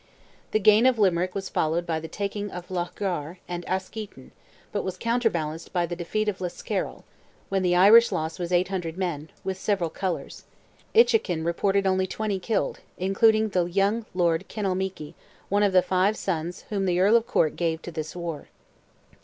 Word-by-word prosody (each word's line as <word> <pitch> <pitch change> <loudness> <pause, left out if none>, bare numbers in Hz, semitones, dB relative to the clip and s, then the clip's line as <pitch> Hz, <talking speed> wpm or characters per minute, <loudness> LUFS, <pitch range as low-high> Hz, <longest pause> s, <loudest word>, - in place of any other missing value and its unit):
The - - +2
gain 215 +4 +6
of 255 -2 +3
Limerick 185 -3 +2
was 195 -1 -3
followed 165 +2 0
by 165 -2 -1
the 160 - -7
taking 205 +2 -4
of 180 -1 -8
Loughgar 175 -2 -3
and 175 0 -4
Askeaton, 190 -6 -5 0.4
but 205 - -1
was 185 -1 -4
counterbalanced 180 -9 -1
by 175 -1 +1
the 175 +1 -5
defeat 215 +5 -2
of 195 -3 -2
Liscarroll, 175 -1 -3 0.5
when 195 -1 +1
the 180 -1 +2
Irish 215 +6 +7
loss 160 +3 -3
was 175 0 -3
800 180 -2 0
men, 165 -5 -3
with 190 -1 -3
several 190 -5 0
colours; 185 -3 -4 0.5
Inchiquin 425 - +4
reported 195 +3 +1
only 190 0 +2
20 210 -1 -2
killed, 215 +3 -1 0.2
including 215 +4 +3
the 180 -3 +1
young 200 +5 0
lord 170 -3 +1
Kinalmeaky, 190 -6 -3 0.4
one 205 +1 +2
of 205 -1 +3
the 185 -1 +5
five 185 +3 +2
sons 175 -1 -3
whom 195 -2 -1
the 180 0 +1
Earl 200 +5 +5
of 235 0 +3
Cork 155 - +2
gave 165 -2 -1
to 175 - -6
this 155 0 -5
war. 170 -4 -5
185 Hz, 170 wpm, -26 LUFS, 170-205 Hz, 0.5 s, Irish